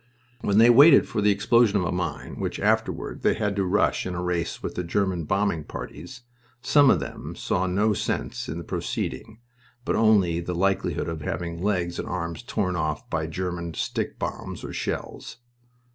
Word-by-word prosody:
When 100 -3 +1
they 115 +2 +8
waited 140 +4 +7
for 105 - -2
the 105 - +4
explosion 105 +1 +3
of 95 - 0
a - - -1
mine 85 -4 -4
which - - -3
afterward - - 0
they - - +2
had 105 -2 -1
to 100 - +2
"rush" 95 +2 +1
in 90 - -4
a 90 - -3
race 90 -2 -2
with - - -3
the 90 - -3
German 90 -1 -1
bombing 95 -2 0
parties, 90 - -9 0.4
some 140 +3 +5
of 90 - +4
them 70 - -7
saw 95 +1 -1
no 105 +4 +2
sense - - -3
in 75 - -4
the 85 - -5
proceeding, 110 +7 -4 0.4
but - - 0
only 100 -7 +3
the 85 +1 -4
likelihood 95 +2 0
of 80 -1 -4
having 85 +2 -4
legs 90 -4 -1
and - - -4
arms 85 0 -4
torn 100 -7 -2
off 75 -3 -2
by 80 0 -1
German 85 0 -4
stick - - -3
bombs - - -5
or - - -6
shells. - - -5
90 Hz, 185 wpm, -25 LUFS, 85-105 Hz, 0.4 s, they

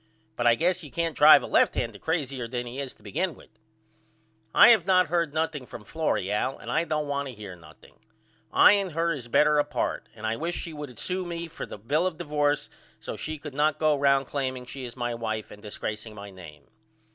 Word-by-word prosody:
But 120 - +1
I 115 - +6
guess 175 +5 0
you 150 - -9
can't 165 +2 -2
drive 150 +1 +8
a - - -3
left - - +3
hander - - -3
crazyer 140 -7 -2
than 125 0 -3
he 120 +3 -7
is 135 -2 -5
to - - -25
begin 185 -3 -2
with. - - -18 1.0
I - - +8
have 215 -7 +5
not 185 -4 +4
heard 170 -2 +1
nothing 155 -4 -2
from 110 - -10
Florrie 150 - -1
Al 130 +6 -1
and - - -7
I 170 - +1
don't 150 -2 -1
want 140 0 -2
to 130 - -8
hear 100 -4 -9
nothing. 80 -2 -18 0.5
I - - +7
and 200 -4 +1
her 165 +1 +1
is 130 -5 -7
better 150 +4 +4
apart 145 0 -2
and 110 0 -8
I 110 +1 -1
wish 170 +2 -3
she 165 - -5
would 145 -5 -8
sew 185 0 -2
me 170 -1 -5
for 165 - -7
a - - -7
bill 145 - 0
of 175 -4 -5
divorce 150 -3 0 0.3
so - - -6
she 155 0 -5
could 150 -1 -9
not 150 +1 +1
go 155 -1 +3
round 140 -1 +3
claiming 130 -2 -3
she 130 +1 -7
is 120 - -8
my 120 -1 -2
wife 110 -2 -4
and 105 - -12
disgraceing 110 +1 -5
my 100 0 -9
name. 85 -5 -13
145 Hz, 225 wpm, -27 LUFS, 120-160 Hz, 1.0 s, drive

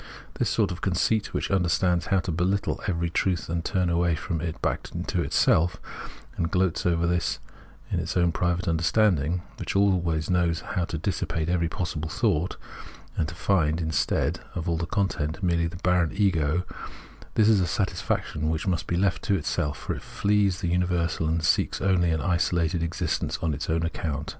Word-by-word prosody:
This - - +2
sort - - +1
of 90 - -6
conceit 100 +3 +1
which - - -2
imderstands 90 -1 +2
how 95 -1 +2
to 90 - -3
behttle 90 +5 0
every 85 -2 -1
truth 85 -3 0
and 85 0 -1
turn 90 +1 0
away 85 -1 +2
from 80 0 -3
it 85 -1 -4
back - - -2
into - - -1
itself, 85 +3 +3 0.6
and 85 - -1
gloats 90 -2 +1
over 85 -1 +2
this 85 0 0 0.5
its - - -1
own 85 -1 +3
private 90 +2 0
understanding, 85 -1 +2
which - - -4
always 90 -6 +2
knows 85 -3 +1
how 90 - -2
to 85 - -4
dissipate 80 +1 -2
every 85 -2 +1
possible 80 -4 -3
thought, 80 +3 0 0.6
and 75 - 0
to 85 - -7
find, 80 -4 +1
instead 80 -1 0 0.2
of 85 0 -3
all 85 - +1
the 85 - -2
content, 95 -5 -1
merely 85 -2 +2
the 85 - -8
barren 90 -2 +3
Ego 90 -5 +1 0.3
— - - -19
this 110 - +4
is 110 -2 +5
a 90 - +1
satisfaction 90 -5 -1
which 80 +1 -1
must 85 -4 -1
be 85 - 0
left 95 0 +1
to 100 - +2
itself; 75 -4 -1
for - - -3
it - - -7
flees 100 -3 +1
the 85 - -1
imiversal 90 -3 0
and 80 0 0
seeks 80 - +2
only 90 -3 +2
an 80 -1 0
isolated 85 -2 +1
existence 85 0 -1
on 80 -2 +1
its - - -4
own 80 +1 +1
account 80 - -3
{Fiirsicliseyn). 75 -2 -3
85 Hz, 185 wpm, -26 LUFS, 80-90 Hz, 0.6 s, is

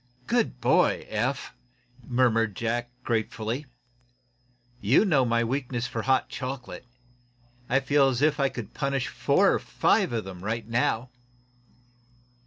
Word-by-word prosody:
"Good 230 - 0
boy, 125 +2 +2
Eph!" 125 +5 -2 0.5
murmured 115 -4 +1
Jack, 120 +2 -2
gratefully. 115 +4 -2 1.1
"You 120 - +4
know 145 -9 +3
my 115 0 +2
weakness 125 -1 -2
for 115 - -3
hot 130 +2 +2
chocolate. 130 -1 -6 0.8
I 135 +2 +3
feel 140 0 +3
as 125 -2 0
if 155 -1 +3
I 135 -1 +3
could 120 -4 -8
punish 140 -2 -1
four - - +3
or - - +1
five - - +1
of 115 -3 -2
'em 95 -2 -9
right 110 +1 -3
now." 120 +1 0
120 Hz, 130 wpm, -26 LUFS, 115-135 Hz, 1.1 s, You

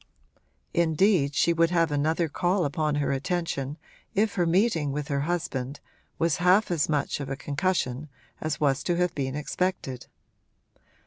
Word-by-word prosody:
Indeed 165 -3 +3
she 170 - +3
would 165 0 +3
have 165 -2 +2
another 160 +3 +1
call 180 +4 0
upon 150 +1 0
her 145 -1 0
attention 145 -1 -2 0.4
if 210 +1 +2
her 175 -2 +1
meeting 170 -5 +2
with 150 +2 -4
her 140 -1 0
husband 140 -6 -2 0.4
was 165 -2 +1
half 185 +3 +4
as 160 -4 +1
much 145 -2 0
of 140 -2 -5
a 135 - -2
concussion 145 -2 -1 0.3
as 155 -3 -2
was 140 -2 +2
to 175 - +1
have 180 0 +1
been 135 -3 -2
expected. 150 -4 -2
155 Hz, 150 wpm, -27 LUFS, 140-175 Hz, 0.4 s, half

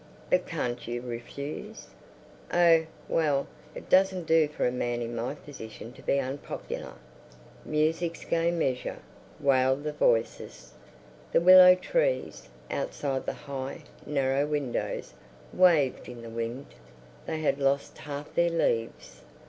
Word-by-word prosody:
"But - - +2
can't 120 -1 -3
you 120 +1 -3
refuse?" 125 +4 -7 0.7
"Oh, 165 -2 +5 0.2
well, 145 -4 +1 0.3
it - - -9
doesn't 185 -2 +3
do 160 -1 +4
for 150 - -2
a 125 - +2
man 120 -1 -2
in 120 0 -4
my 120 +5 -3
position 120 -5 -10
to - - -14
be 140 - +1
unpopular." 135 +1 -5 0.7
Music's 165 +2 -1
Gay 170 0 +1
Measure, 145 -7 -1 0.4
wailed 130 0 +2
the 150 0 -3
voices. 115 - 0 0.6
The - - +4
willow 180 +1 +9
trees, - - -1 0.2
outside 140 - -3
the - - -1
high, 135 -1 -5 0.2
narrow 140 0 0
windows, 145 -4 -3 0.4
waved 165 -10 +3
in 120 -1 -9
the 115 - -8
wind. 115 +4 -5 0.5
They 155 - -3
had 145 -2 +1
lost 140 0 0
half 145 0 -7
their 170 0 +3
leaves. 115 - -2
140 Hz, 130 wpm, -28 LUFS, 125-165 Hz, 0.7 s, willow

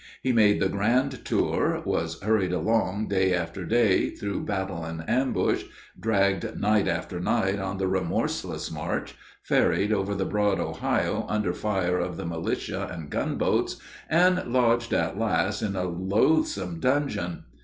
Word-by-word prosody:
He 130 - +2
made 105 -3 +4
the 95 - +2
grand 120 +7 0
tour, - - +1
was 80 0 -1
hurried 105 -4 +2
along 105 +1 0
day 95 -2 +2
after 90 +1 -4
day 115 -3 +3
through 100 -1 -4
battle 95 -4 -3
and 80 0 -6
ambush, 130 +4 +1 0.4
dragged 100 -3 +1
night 105 -1 +2
after 90 0 -2
night 95 +2 +1
on 95 0 -3
the 95 - -1
remorseless 95 -2 -1
march, - - -3 0.3
ferried 105 +2 +2
over 100 0 0
the 95 0 -1
broad 105 -2 +1
Ohio - - -1
under 105 -5 0
fire 90 -3 0
of 90 -1 -3
the - - -5
militia 85 -1 -3
and 80 -4 -7
gunboats, - - 0 0.3
and 180 +3 +4
lodged 120 -1 +2
at - - 0
last 105 -2 +1
in 100 -2 -2
a 90 - -1
"loathsome 95 - +1
dungeon." 130 - 0
100 Hz, 145 wpm, -26 LUFS, 90-110 Hz, 0.4 s, made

